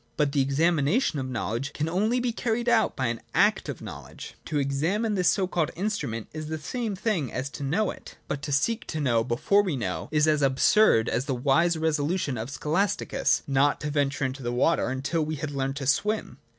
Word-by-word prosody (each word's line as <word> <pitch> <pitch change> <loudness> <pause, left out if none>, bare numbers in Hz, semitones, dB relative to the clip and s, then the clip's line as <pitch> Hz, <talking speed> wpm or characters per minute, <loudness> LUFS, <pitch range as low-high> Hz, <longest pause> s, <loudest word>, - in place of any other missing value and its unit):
But 150 -2 +2
the 140 -1 +2
examination 155 - +2
of 130 -1 -4
knowledge 120 +5 -3
can 155 - -2
only 210 +9 +1
be 245 -1 0
carried 235 0 -1
out 230 -2 +3
by 130 - -1
an 115 -1 -2
act 205 +5 +3
of - - -6
know - - -7
ledge. - - -11
To 155 - -2
examine 160 +11 0
this 180 -3 +3
so 195 - +2
called 175 -4 0
instrument 170 - -3
is 155 0 -5
the 160 +1 -3
same 220 +6 -3
thing 185 - -1
as 130 +2 -4
to - - -8
know 185 +10 +1
it. - - -12
But 140 0 -3
to 145 - -5
seek 220 +12 0
to 155 - -3
know 120 -6 +2
before 125 - +2
we 185 -7 -2
know 100 -8 -3
is 150 0 +3
as 150 -1 +3
absurd 135 - +4
as 125 +3 -1
the 135 -3 -1
wise 160 +7 +2
resolution 155 -1 0
of 115 +3 -4
Scholas 160 +8 0
ticus, - - 0
not 140 +1 +2
to 150 - -3
venture 140 -1 0
into 130 +1 -4
the 120 -1 -2
water 130 +7 +2
until 135 +5 -1
he 155 - -1
had 145 0 -4
learned 135 -1 -2
to 140 -1 -4
swim. 200 - 0
150 Hz, 215 wpm, -26 LUFS, 135-185 Hz, -, absurd